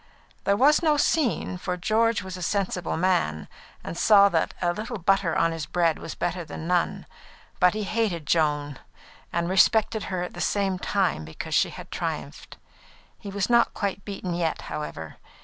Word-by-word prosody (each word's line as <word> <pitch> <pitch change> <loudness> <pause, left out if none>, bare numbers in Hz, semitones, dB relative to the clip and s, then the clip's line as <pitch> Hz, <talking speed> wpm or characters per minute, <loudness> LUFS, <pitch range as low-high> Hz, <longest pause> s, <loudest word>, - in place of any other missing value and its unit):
There 200 0 +3
was 290 +6 +5
no 310 -3 +3
scene, 285 - +1
for 180 0 -3
George 220 +4 +1
was 185 -1 -7
a 180 - -8
sensible 185 -3 -1
man, 165 - 0 0.4
and - - -6
saw 200 +2 +6
that - - 0
a 175 -1 +1
little 220 +4 -5
butter 190 -3 +1
on 165 0 +2
his 165 -2 -5
bread 170 -3 +1
was 165 - -7
better 175 0 -2
than 160 - -8
none. 175 0 0 0.5
But 180 +1 +4
he 215 - -2
hated 200 -6 -1
Joan, 145 -3 0 0.5
and 170 0 -1
respected 215 +3 +3
her 185 -2 -2
at 180 - -6
the - - -6
same 195 -2 0
time 190 - 0
because 80 +1 -7
she - - +3
had - - -10
triumphed. - - -5 0.6
He 200 - -8
was 200 0 -1
not 235 -1 +3
quite 200 -1 -3
beaten 195 -3 -5
yet, 170 -2 -1
however. 80 - -6
185 Hz, 175 wpm, -25 LUFS, 170-205 Hz, 0.6 s, saw